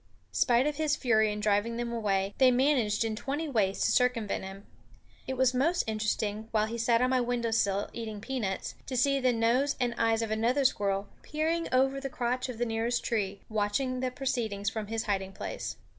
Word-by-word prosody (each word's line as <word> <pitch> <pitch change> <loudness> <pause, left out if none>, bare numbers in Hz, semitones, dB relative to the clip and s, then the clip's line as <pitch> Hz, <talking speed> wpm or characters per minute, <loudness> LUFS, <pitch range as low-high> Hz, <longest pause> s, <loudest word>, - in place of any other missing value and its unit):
Spite 245 +1 +3
of 300 -1 -1
his 305 -1 +1
fury 220 -5 +2
in 210 - -4
driving 210 +2 +1
them 240 0 -3
away, 200 -3 0
they 260 -1 +7
managed 250 -4 +2
in 220 -1 -2
twenty 285 +8 -3
ways 205 -8 0
to - - +3
circumvent 245 -6 +1
him. 195 +1 -9 0.6
It 260 - -3
was 260 -1 +3
most 325 +8 +2
interesting, 215 0 -2
while 215 -1 +2
he 230 +2 -5
sat 230 +1 +3
on 255 - +2
my 255 -1 +3
window 240 -1 -1
sill 200 -2 +1
eating 220 -3 -5
peanuts, 215 -5 -3
to 255 - -3
see 275 +3 +3
the 255 -1 +3
nose 240 +5 +2
and 245 -2 0
eyes 225 0 +2
of 220 - -3
another 240 +6 +1
squirrel 200 -4 +1
peering 325 +2 -1
over 270 +1 +2
the 275 - -4
crotch 250 +1 -2
of 245 - -5
the 240 - 0
nearest 230 +1 -1
tree, 200 -4 -2
watching 220 +5 -1
the 255 0 0
proceedings 230 -7 -2
from 220 -2 -4
his 225 +1 -2
hiding 195 -2 -2
place. - - -5
230 Hz, 200 wpm, -29 LUFS, 215-255 Hz, 0.6 s, they